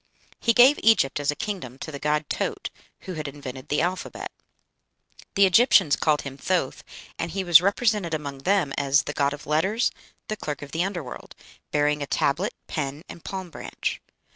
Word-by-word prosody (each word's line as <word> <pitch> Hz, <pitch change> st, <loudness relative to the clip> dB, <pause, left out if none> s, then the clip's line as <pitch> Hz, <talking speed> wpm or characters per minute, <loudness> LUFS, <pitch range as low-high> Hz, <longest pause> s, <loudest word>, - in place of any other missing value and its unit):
He 230 Hz, -, +3 dB
gave 255 Hz, +5 st, +7 dB
Egypt 215 Hz, -12 st, +4 dB
as 145 Hz, -, -1 dB
a 150 Hz, -, +2 dB
kingdom 175 Hz, -, -5 dB
to 155 Hz, -, -7 dB
the 140 Hz, -, -6 dB
god 150 Hz, +1 st, 0 dB
Taaut, -, -, -3 dB, 0.3 s
who 185 Hz, -, -6 dB
had 155 Hz, -3 st, -4 dB
invented 135 Hz, -2 st, -8 dB
the 150 Hz, -, +2 dB
alphabet. 180 Hz, +2 st, -3 dB, 1.0 s
The 200 Hz, -, +6 dB
Egyptians 190 Hz, -, +5 dB
called 150 Hz, -2 st, +1 dB
him 135 Hz, -1 st, -7 dB
Thoth, 170 Hz, -2 st, -1 dB, 0.4 s
and 165 Hz, -, -2 dB
he 195 Hz, +2 st, -2 dB
was 175 Hz, -2 st, +8 dB
represented 200 Hz, -3 st, +1 dB
among 140 Hz, -3 st, -6 dB
them 175 Hz, -2 st, +1 dB
as 140 Hz, -1 st, +3 dB
"the 145 Hz, -, -5 dB
god 140 Hz, -1 st, +1 dB
of 145 Hz, -, -8 dB
letters, 190 Hz, +10 st, +1 dB, 0.4 s
the 215 Hz, -, -2 dB
clerk 150 Hz, -5 st, -5 dB
of 145 Hz, -, -10 dB
the 165 Hz, +4 st, 0 dB
under 185 Hz, -4 st, -3 dB
world," 125 Hz, -, -10 dB, 0.3 s
bearing 150 Hz, 0 st, +1 dB
a 140 Hz, -, -3 dB
tablet, 180 Hz, -, 0 dB
pen, 145 Hz, 0 st, -4 dB
and 170 Hz, -, -11 dB
palm 190 Hz, -3 st, -6 dB
branch. -, -, -4 dB
155 Hz, 185 wpm, -25 LUFS, 140-190 Hz, 1.0 s, was